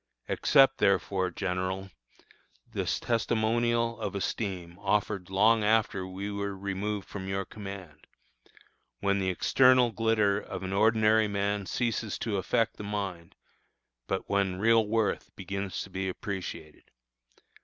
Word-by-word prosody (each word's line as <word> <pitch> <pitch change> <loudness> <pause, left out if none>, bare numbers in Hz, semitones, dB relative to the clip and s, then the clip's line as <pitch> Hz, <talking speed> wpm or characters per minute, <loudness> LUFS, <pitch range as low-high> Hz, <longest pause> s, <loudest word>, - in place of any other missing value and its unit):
Accept, 135 0 +4
therefore, 100 -2 +2
General, 95 +1 -3 0.8
this - - -2
testimonial 115 0 +1
of - - -3
esteem 95 -3 -3
offered 100 -2 0
long 110 +3 +4
after 105 -3 +1
we 95 +2 -5
were 100 -1 -3
removed 100 +1 -3
from 95 -2 -6
your 95 0 -2
command, 95 -7 -9 0.9
when 100 0 +1
the 95 -1 0
external 125 +6 +4
glitter 110 -3 +2
of 95 -3 -7
an 95 +1 -3
ordinary 110 +1 +4
man 100 -1 -1
ceases 115 0 -1
to 105 -4 -2
affect 110 +4 0
the - - -7
mind, 100 -5 -4 0.7
but 95 - -2
when 100 -2 +1
real 110 +1 +4
worth 110 -2 0
begins 95 -1 -4
to 100 - -13
be 95 +1 -2
appreciated. 90 -5 -6
100 Hz, 125 wpm, -29 LUFS, 95-110 Hz, 0.9 s, Accept